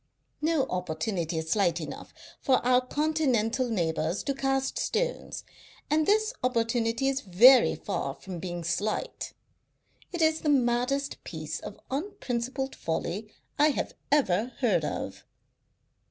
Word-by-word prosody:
No 315 -2 +2
opportunity 175 -2 -2
is 160 0 -3
slight 175 -5 +2
enough 155 - -7 0.3
for 265 - +3
our 250 0 +5
continental 260 -5 +1
neighbours 165 -3 -1
to 275 - 0
cast 270 0 0
stones, - - -2 0.5
and 310 0 +3
this 435 +3 +3
opportunity 230 0 +1
is 270 0 0
very 240 +7 +7
far - - -3
from 185 -3 -8
being 175 -1 -5
slight. 205 - -2 0.8
It 345 -3 0
is 315 0 +3
the 305 - 0
maddest 265 +1 +1
piece 155 -2 -5
of 205 - -9
unprincipled 270 - -3
folly 185 +6 -3 0.3
I 295 - +6
have 300 - -1 0.2
ever 245 -5 +2
heard - - +3
of." - - -4
245 Hz, 125 wpm, -28 LUFS, 185-280 Hz, 0.8 s, very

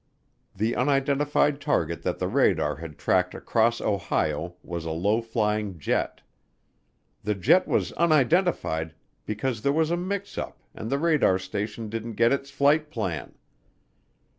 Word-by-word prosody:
The 110 +4 0
unidentified 145 +1 +2
target 85 - 0
that - - -2
the - - -1
radar 75 -1 +2
had 80 -2 -9
tracked 90 +2 +1
across 115 0 +1
Ohio 85 -4 -1
was 85 -2 -5
a 80 - -4
low 100 +8 +1
flying 105 -4 -1
jet. 75 - -1 1.0
The 105 - -1
jet 100 - +4
was - - 0
unidentified 155 - +2 0.3
because 110 +2 -2
there 140 - +2
was 160 +2 +1
a 170 - +1
mix 200 +3 -4
up - - -7
and 110 - -6
the 140 - +1
radar 150 - +3
station 105 +4 -4
didn't 115 +1 -5
get 115 +4 +3
its 140 0 -2
flight 145 +2 +2
plan. 95 - -4
115 Hz, 140 wpm, -26 LUFS, 95-145 Hz, 1.0 s, jet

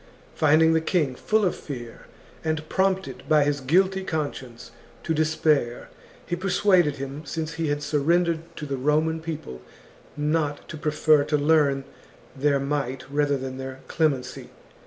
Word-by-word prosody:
Finding 160 +1 +4
the 160 - +2
king 160 -6 +1
full 215 +10 +1
of 180 - 0
fear, 120 -5 -9 0.4
and 155 0 -2
prompted 190 -10 0
by 150 -1 +5
his 145 -1 0
guilty 190 +7 +2
conscience 130 -8 -5 0.3
to 165 - 0
despair, 155 -5 +1 0.4
he 175 - -2
persuaded 180 -4 +2
him, 140 +2 -6
since 160 +2 -4
he 165 -1 -2
had 145 0 -1
surrendered 165 +3 +2 0.2
to 150 - -6
the 140 -2 -3
Roman 155 +4 +1
people, 150 - -6 0.6
not 150 -1 -1
to - - -6
prefer 150 -1 +3
to 150 0 +1
learn 145 -2 +3 0.5
their 140 +1 +2
might 140 -2 -2
rather 145 -1 +1
than 130 0 -6
their 130 0 -7
clemency. 150 -6 -1
150 Hz, 145 wpm, -25 LUFS, 140-160 Hz, 0.6 s, by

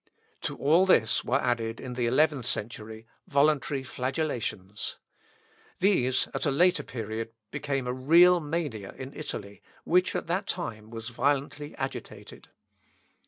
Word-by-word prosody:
To - - -3
all 165 +7 +4
this 115 -11 +4
were 135 +3 +1
added, 115 -3 -1
in 125 - -6
the 120 -1 0
eleventh 140 0 +2
century, 110 0 -4 0.2
voluntary 140 -3 +2
flagellations. 125 - -3 0.8
These, 130 -10 +3
at - - -1
a - - +4
later 170 +3 +4
period, 115 -3 -5 0.2
became 135 -3 -2
a 125 - -1
real 170 +7 +6
mania 145 -10 -3
in 130 +1 -7
Italy, 100 -9 -6 0.2
which 180 +2 +2
at - - -2
that 180 +4 -1
time 110 -11 -4
was 115 0 -6
violently 145 +3 -1
agitated. 135 0 -7
135 Hz, 130 wpm, -28 LUFS, 115-155 Hz, 0.8 s, real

